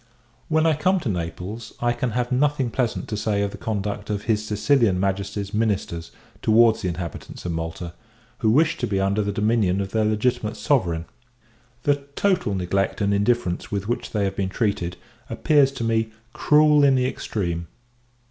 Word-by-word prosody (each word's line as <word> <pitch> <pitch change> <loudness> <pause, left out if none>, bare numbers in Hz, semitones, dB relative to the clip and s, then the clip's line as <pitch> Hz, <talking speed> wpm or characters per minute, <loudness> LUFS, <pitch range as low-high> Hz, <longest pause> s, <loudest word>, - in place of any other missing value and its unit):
When 160 0 +3
I 160 - +4
come 185 +6 +2
to 135 - -2
Naples, 90 +5 -5
I 120 0 +1
can 120 +1 -2
have 125 0 -1
nothing 135 -1 +1
pleasant 125 -3 -1
to 105 - -2
say 105 -1 0
of 100 - -2
the - - -8
conduct 105 -1 -3
of 105 -1 -2
his 105 -1 +1
Sicilian 105 -1 +2
Majesty's 100 +1 -2
ministers 100 -6 -1 0.3
towards 115 0 +4
the - - -1
inhabitants 85 0 -6
of 90 - -1
Malta, 85 +1 -4 0.5
who 110 - +2
wish 155 +8 +3
to 120 - -2
be 100 -3 0
under 100 +2 +1
the 100 0 -1
dominion 105 -2 +1
of 95 -1 -3
their 110 -1 +1
legitimate 110 +1 0
Sovereign. 85 - +1 0.8
The 145 -1 +3 0.2
total 180 - +1
neglect 95 +1 -1
and 100 -1 +1
indifference 100 -3 0
with 100 -1 -2
which 120 - -2
they 105 -2 -1
have 95 -1 -1
been 95 -1 -1
treated, 95 -4 -1 0.3
appears 145 -3 +3
to 125 - -4
me 115 -1 +1 0.2
cruel 150 -1 +4
in 135 -1 +5
the 125 -1 +2
extreme. 85 -9 -3
105 Hz, 175 wpm, -23 LUFS, 95-120 Hz, 0.8 s, in